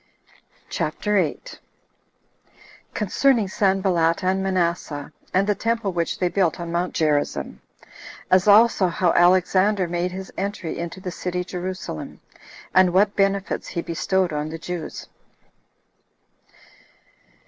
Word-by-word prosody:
CHAPTER 210 0 -2
8. 190 - -2 1.4
Concerning 225 +2 +2
Sanballat 190 -4 +1
And 190 +1 +1
Manasseh, 170 -6 -1 0.2
And 190 +2 +2
The 210 - +2
Temple 225 -2 -1
Which 170 -1 -1
They 180 - +1
Built 180 -2 0
On 170 -1 -5
Mount 175 +1 -2
Gerizzim; 150 -2 -1 0.7
As 185 +2 +4
Also 210 -2 +6
How 175 0 +1
Alexander 185 +2 +3
Made 175 +1 -2
His 190 +1 -8
Entry 195 -4 -4
Into 170 +2 -5
The 185 -1 -5
City 180 0 -3
Jerusalem, 180 - -6 0.5
And 185 -1 +5
What 205 +2 +3
Benefits 195 -2 0
He 170 - -4
Bestowed 180 +1 0
On 150 +1 -2
The 165 - -6
Jews. 165 -1 -6
185 Hz, 115 wpm, -23 LUFS, 170-195 Hz, 1.4 s, Also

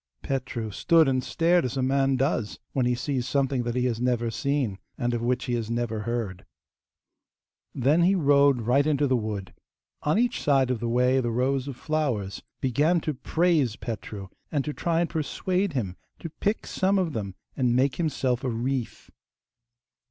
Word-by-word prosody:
Petru 120 -4 -3
stood 165 - +4
and 130 -1 +1
stared 170 +4 +2
as 125 +1 -3
a 130 - +1
man 135 +1 +2
does 130 -5 -1 0.2
when 130 -3 +1
he 125 - +2
sees 125 0 -2
something 135 -1 +1
that 120 0 -3
he 125 0 +1
has 120 -2 -1
never 120 -2 +1
seen, 130 -6 -1 0.2
and 120 0 -1
of 120 - -1
which 125 +1 0
he 125 - -2
has 115 -2 -2
never 115 -2 -1
heard. 105 -5 -3 1.3
Then 140 +6 +3
he 185 +3 +4
rode 140 -6 +4
right 135 +6 +3
into 145 -1 +2
the 130 -2 +2
wood. 105 -5 -3 0.5
On 150 +6 +1
each 245 +1 +1
side 135 -3 +3
of 125 - -1
the 120 +1 -2
way 125 +2 +3
the 120 -2 0
rows 130 +3 0
of 140 - -5
flowers 130 -12 -2 0.2
began 145 +7 +2
to 155 - -2
praise 155 -4 +1
Petru, 105 -5 -6 0.2
and 145 -3 0
to 150 - -3
try 170 +1 0
and 175 - +1
persuade 180 +4 -1
him 100 -9 -2 0.2
to 165 - -7
pick 205 +7 -1
some 195 +1 +1
of 175 -5 0
them 100 -4 -4 0.2
and 125 -2 +1
make 130 +2 +2
himself 135 -7 0
a 130 - 0
wreath. 125 +1 -3
130 Hz, 180 wpm, -26 LUFS, 120-150 Hz, 1.3 s, stood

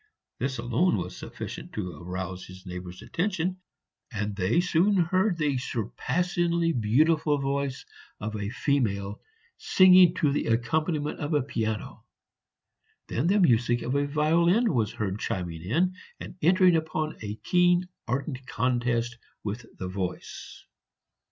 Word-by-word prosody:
This 130 +1 -1
alone 120 - +1
was 90 0 -5
sufficient - - -8
to 90 -6 -4
arouse 90 +1 -5
his 95 +1 -12
neighbors' 90 +1 -7
attention, 185 - -1 0.5
and 105 -2 -3
they 100 - +2
soon 180 +3 +3
heard 185 +2 +2
the 145 -5 +1
surpassingly 170 - 0
beautiful 150 +7 +3
voice 140 -1 -2 0.3
of 110 +1 -4
a 100 -1 -3
female 105 -7 -1 0.4
singing 185 -2 +6
to 150 -6 +2
the 145 - -1
accompaniment 150 +7 0
of 150 +1 -1
a 145 - +2
piano. 110 -5 -3 1.1
Then 130 +8 0
the 200 +3 +4
music 120 - +3
of 125 - -2
a 140 0 +1
violin 170 +9 +3
was 110 -5 +1
heard 100 -1 -3
chiming 90 -8 -3
in 165 - +1 0.3
and - - -8
entering 180 +2 +5
upon 155 -1 -2
a 105 -1 -4
keen 180 +6 +2 0.2
ardent 130 +1 -3
contest 120 -1 0 0.2
with 110 +3 -5
the 95 - -4
voice. 90 -1 -6
135 Hz, 130 wpm, -27 LUFS, 105-170 Hz, 1.1 s, singing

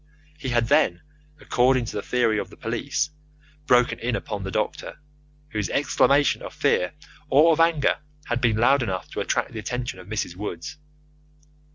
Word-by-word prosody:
He 135 - -4
had 120 -1 +2
then, 90 -5 +2 0.4
according 125 0 +2
to - - -6
the 105 - -1
theory 115 -2 +1
of - - -5
the - - -15
police, 135 +5 -2 0.6
broken 125 0 +3
in 120 0 -1
upon 105 -2 -4
the 95 - -4
doctor, 105 +8 -3 0.5
whose 105 -6 -2
exclamation 140 0 +3
of - - -8
fear - - +1 0.4
or 155 +5 +6
of 160 - +1
anger 165 -3 +3 0.3
had 120 0 -2
been 115 -3 +2
loud 135 +5 +4
enough 95 -6 -3
to - - -4
attract - - -1
the 115 - -6
attention 120 -2 -4
of 90 - -12
Mrs. 105 -5 -3
Woods. 90 - -6
120 Hz, 170 wpm, -24 LUFS, 105-135 Hz, 0.6 s, or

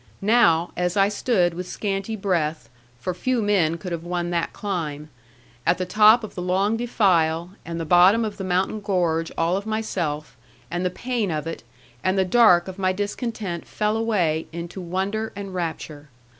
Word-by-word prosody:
Now, 180 -7 +4
as 180 +2 -1
I 195 0 +4
stood 200 -5 +1
with 180 +1 -6
scanty 200 +1 -3
breath 165 - -1 0.3
for 180 +8 -3
few 250 +7 -1
men 190 -7 +2
could 180 +2 -7
have 165 -1 -3
won 175 0 -2
that 170 -1 -1
climb 155 -7 -4 0.5
at - - +2
the 185 - -2
top 215 +5 +6
of 215 - -7
the 180 - -5
long 190 +4 +1
defile, 180 -8 +1
and 170 0 -5
the 165 - -3
bottom 185 +7 +5
of 210 -2 -5
the 195 - -5
mountain 185 +3 0
gorge 175 -5 0
all 170 +3 +1
of 200 +2 -6
myself, 175 -9 -3 0.4
and 175 +1 -2
the 180 - +1
pain 235 +1 -2
of 155 -2 -2
it, 165 - -5 0.4
and 185 +1 +1
the 190 - +3
cark 185 -4 +5
of 190 +1 -8
my 185 -1 +2
discontent 205 -2 -4
fell 210 0 -1
away 185 -9 0
into 170 +3 -6
wonder 195 +5 -2
and 195 -2 -6
rapture. 160 -4 -5
185 Hz, 180 wpm, -23 LUFS, 170-205 Hz, 0.5 s, top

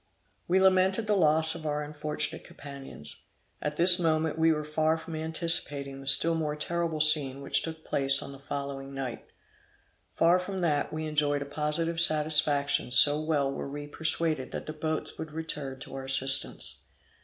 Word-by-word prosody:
We 185 +2 +2
lamented 190 +2 +2
the 210 -1 0
loss 160 -2 +3
of 160 -2 -7
our 150 0 -2
unfortunate 150 0 -3
companions. 135 - -8 0.4
At 150 0 -4
this 175 +1 +6
moment 160 -2 0
we 160 0 +2
were 150 -1 -2
far 155 +1 -1
from 165 0 -9
anticipating 155 -4 -1
the 135 - -9
still 165 +5 +5
more 155 -2 -3
terrible 165 +1 -3
scene 150 -3 +3
which 140 - +1
took 160 -1 -8
place 135 0 +1
on - - -6
the 135 - -12
following 140 -1 -7
night; 130 -3 -6 0.9
far 170 +2 +2
from 190 +1 -6
that, 150 -4 -1
we 155 0 -5
enjoyed 145 -2 -1
a - - -12
positive 150 +3 -2
satisfaction 150 -4 +2
so 145 +4 +7
well 150 -3 -1
were 140 - -6
we 145 +1 -7
persuaded 160 -1 -1
that - - -6
the 155 - -7
boats 155 0 -5
would 155 -1 -8
return 150 -4 -5
to - - -10
our 135 0 -7
assistance. 135 +1 +3
150 Hz, 170 wpm, -27 LUFS, 140-160 Hz, 0.9 s, so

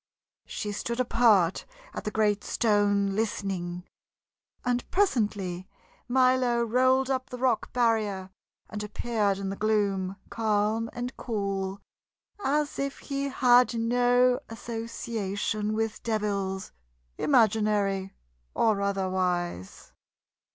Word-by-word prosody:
She 210 - -4
stood 235 +4 -3
apart 225 -8 +3 0.3
at - - -6
the - - 0
great 210 -1 +1
stone, 205 -3 +2
listening, 190 -5 -2 0.8
and 245 0 -1
presently 205 - 0 0.4
Milo 255 -1 +3
rolled 255 +3 +2
up 260 0 -2
the 250 - -6
rock 250 -2 0
barrier, 215 -6 0 0.4
and 210 0 -5
appeared 210 -1 -1
in 195 -1 -3
the - - -4
gloom, 200 -3 0 0.2
calm 220 0 0
and 245 +1 -5
cool 195 -3 -3 0.6
as 290 +1 0
if 275 0 -2
he 275 -1 -3
had 250 -2 +4
no 245 +2 +3
association 225 -2 -3
with 225 0 -2
devils, 200 -4 -2 0.5
imaginary 210 -5 +2 0.4
or 215 -3 +2
otherwise. 185 - -2
215 Hz, 100 wpm, -27 LUFS, 195-245 Hz, 0.8 s, had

